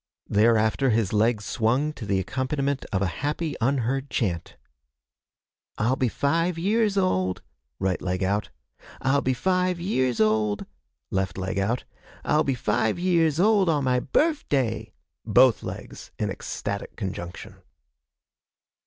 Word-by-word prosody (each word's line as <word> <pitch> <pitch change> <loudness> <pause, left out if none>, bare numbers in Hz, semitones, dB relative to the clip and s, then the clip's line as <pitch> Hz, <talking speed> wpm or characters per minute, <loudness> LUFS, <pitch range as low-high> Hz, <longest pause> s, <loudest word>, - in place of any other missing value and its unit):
Thereafter 110 +4 +3
his 110 -3 +1
legs 110 0 +2
swung 125 +9 +1
to 110 -8 -8
the 100 -1 +1
accompaniment 135 +5 -2
of 95 -1 +1
a 90 - -2
happy 150 +1 -2
unheard 135 +2 0
chant: 90 -9 -2 1.2
'I'll 120 +5 +2
be 130 -2 +1
five 165 +7 0
years 205 +3 +1
old' 95 - +1 0.3
(right 95 -2 -1
leg 90 +1 -1
out), 100 +2 0 0.5
'I'll 135 +2 +2
be 130 0 0
five 180 +3 +1
years 130 - 0
old' 110 -1 +2 0.5
(left 95 -2 -1
leg 95 0 -2
out), 115 +6 0 0.4
'I'll 155 +1 +3
be 135 -3 0
five 110 -1 0
years 170 -4 +2
old 200 -2 +4
on 150 -3 +2
my 125 -1 +2
birf 305 - +1
day!' 115 -6 0 0.3
(Both - - +5
legs - - -8
in - - -1
ecstatic 100 0 -5
conjunction.) 90 -4 -6
125 Hz, 135 wpm, -25 LUFS, 105-150 Hz, 1.2 s, Both